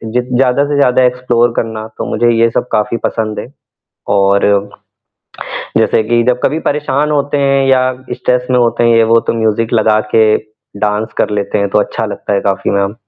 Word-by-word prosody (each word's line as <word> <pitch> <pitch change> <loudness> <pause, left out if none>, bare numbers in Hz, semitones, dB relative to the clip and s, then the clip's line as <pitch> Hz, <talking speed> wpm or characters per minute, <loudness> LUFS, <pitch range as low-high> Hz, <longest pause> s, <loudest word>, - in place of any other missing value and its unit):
ज 125 - +2
ज़्यादा 130 +2 +2
से 145 - -1
ज़्यादा 130 -2 +3
एक्सप्लोर 125 -1 +1
करना, 110 -1 -3
तो 110 - -7
मुझे 120 +2 +1
ये 115 0 +3
सब 120 - -2
काफ़ी 105 +2 0
पसंद 110 -1 -2
है। - - -6 0.7
और, 100 0 +2 1.3
जैसे 110 - +2
कि 120 0 +2
जब 125 0 +1
कभी 155 - +1
परेशान 150 0 -1
होते 145 0 0
हैं 135 -1 +2
या 130 -1 +4 0.3
स्ट्रेस 125 0 -1
में 125 - +3
होते 120 0 +1
हैं 115 0 +4
वो 115 +1 +3
तो - - +1
म्यूज़िक 110 +1 0
लगा 110 -2 +3
के 110 -1 +5 0.6
डांस 105 +1 -1
कर - - +1
लेते 100 - -2
हैं 100 0 0
तो - - +2
अच्छा - - -3
लगता - - -5
है 100 - +1
काफ़ी 100 0 -1
मैम। 100 +1 0
115 Hz, 190 wpm, -13 LUFS, 110-125 Hz, 1.3 s, के